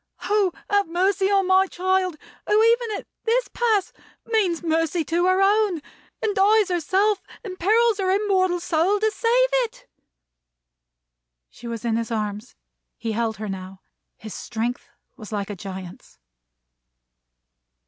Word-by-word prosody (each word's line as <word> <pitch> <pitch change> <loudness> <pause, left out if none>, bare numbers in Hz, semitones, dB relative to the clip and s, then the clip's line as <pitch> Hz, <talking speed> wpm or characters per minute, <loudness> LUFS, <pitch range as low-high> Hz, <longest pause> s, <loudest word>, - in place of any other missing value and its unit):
Oh, 410 -3 +2 0.2
have 405 -2 +2
mercy 380 +3 +1
on 395 -1 +3
my 375 +1 +4
child, 370 -2 0 0.3
who, 425 +1 +4
even 460 -2 +2
at - - -9 0.2
this 485 +2 +1
pass, 440 -5 0 0.3
means 385 -7 0
mercy 325 0 0
to 345 +3 +1
her 370 +1 +3
own, 405 -3 +2 0.4
and 430 -2 +1
dies 415 +1 +4
herself, 380 +4 +1 0.2
and 370 -4 -8
perils 440 +3 +3
her 380 -1 0
immortal 375 -2 +2
soul, 345 +4 +1
to 435 +1 +1
save - - +2 0.2
it!" - - -13 1.6
She 240 - -11
was 230 0 -5
in 225 -1 +1
his 230 -1 -3
arms. 215 0 -4 0.4
He 230 - -3
held 220 -1 -1
her 215 +1 -5
now. 190 -1 -7 0.4
His 215 -3 -9
strength 240 +4 -4 0.3
was 215 -3 -10
like 205 -1 -3
a - - -5
giant's. 190 - -9
370 Hz, 140 wpm, -23 LUFS, -, 1.6 s, my